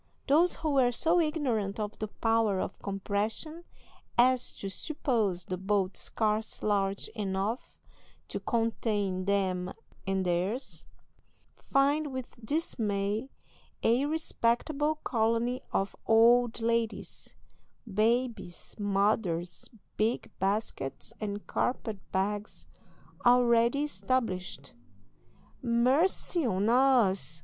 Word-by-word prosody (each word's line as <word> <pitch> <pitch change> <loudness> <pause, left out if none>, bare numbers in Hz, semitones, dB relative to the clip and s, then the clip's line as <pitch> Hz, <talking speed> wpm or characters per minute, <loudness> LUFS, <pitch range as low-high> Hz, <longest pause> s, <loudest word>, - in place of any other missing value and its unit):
Those 325 +5 +4
who 315 -2 -2
were 260 -3 +4
so 330 +8 +2
ignorant 255 -11 0
of 210 0 -4
the 215 - -2
power 225 -2 +1
of - - -4
compression 210 - -3 0.5
as 250 +1 +4
to 195 - -6
suppose 210 - -1
the 185 -1 -4
boat 195 -1 0
scarce 215 0 -2
large 195 -2 0
enough 205 +2 -3 0.6
to - - -3
contain 210 -5 -1
them 190 -2 0 0.4
and 190 -1 0
theirs, 180 +8 -1 0.7
find, 285 +2 +1
with 255 -2 -7
dismay, 215 -5 -1 0.5
a 245 +5 +3
respectable 300 0 0
colony 230 +1 +1
of 195 0 -1
old 235 +1 +5
ladies, 230 -1 -2 0.5
babies, 225 -2 -1
mothers, 195 -4 0 0.3
big 220 +3 0
baskets, 195 -8 -2
and 205 -1 -4
carpet 220 -4 -2
bags 205 +2 -2 0.6
already 240 +2 +4
established. 190 - -2 0.9
"Mercy 260 +9 +2
on 205 -3 +1
us!" 230 - +3
225 Hz, 95 wpm, -30 LUFS, 195-255 Hz, 0.9 s, old